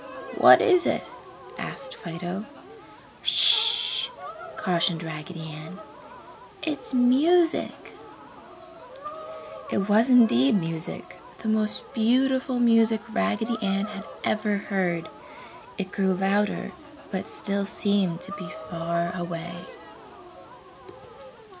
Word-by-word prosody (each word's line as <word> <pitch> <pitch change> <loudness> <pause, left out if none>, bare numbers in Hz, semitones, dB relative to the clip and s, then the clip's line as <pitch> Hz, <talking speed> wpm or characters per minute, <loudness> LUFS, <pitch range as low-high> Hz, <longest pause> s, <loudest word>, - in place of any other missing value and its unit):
"What - - +8
is 370 -7 +4
it?" - - 0 0.6
asked 265 -1 -6
Fido. 175 +4 -6 0.8
"Sh!" 450 +3 +4 0.5
cautioned 170 -2 0
Raggedy 160 0 -7
Ann, 155 +4 -10 0.9
"It's 305 -2 -4
music." 295 +8 +2 1.8
It 195 0 -1
was 220 +4 +4
indeed 205 - +5
music, 165 -1 -5 0.2
the 220 - -1
most 215 -1 0
beautiful 260 +3 +1
music 230 -2 +4
Raggedy 105 - -1
Ann 195 0 0
had 210 -1 -8 0.2
ever 215 -1 0
heard. 180 -5 -2 0.7
It 195 -2 -4
grew 190 -2 0
louder, 200 +2 0 0.4
but 190 -2 -3
still 200 0 -2
seemed 195 -5 0
to - - -6
be 200 -4 -7
far 170 +2 -4
away. 175 0 -6
200 Hz, 95 wpm, -25 LUFS, 170-230 Hz, 1.8 s, What